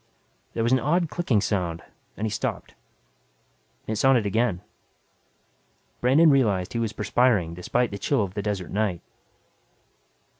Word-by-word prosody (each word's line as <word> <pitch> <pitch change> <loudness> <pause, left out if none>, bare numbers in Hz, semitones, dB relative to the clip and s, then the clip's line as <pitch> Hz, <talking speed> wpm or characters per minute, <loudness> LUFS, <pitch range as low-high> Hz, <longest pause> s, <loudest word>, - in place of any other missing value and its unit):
There 115 - -1
was 120 - +1
an 130 - +4
odd 165 +6 0
clicking 135 - +1
sound 90 -5 -2 0.3
and 110 - -2
he 110 - -2
stopped. 100 - -4 1.1
It 110 - -3
sounded 125 -2 +3
again. 100 -3 0 1.4
Brandon 145 +6 +5
realized 105 -10 +1
he 115 - -1
was 115 -2 -1
perspiring 105 -7 +1
despite 115 +7 -1
the 100 - -6
chill 120 +3 +1
of 95 -2 -5
the 100 - -3
desert 100 -4 -3
night. 100 -4 -1
110 Hz, 140 wpm, -25 LUFS, 100-125 Hz, 1.4 s, Brandon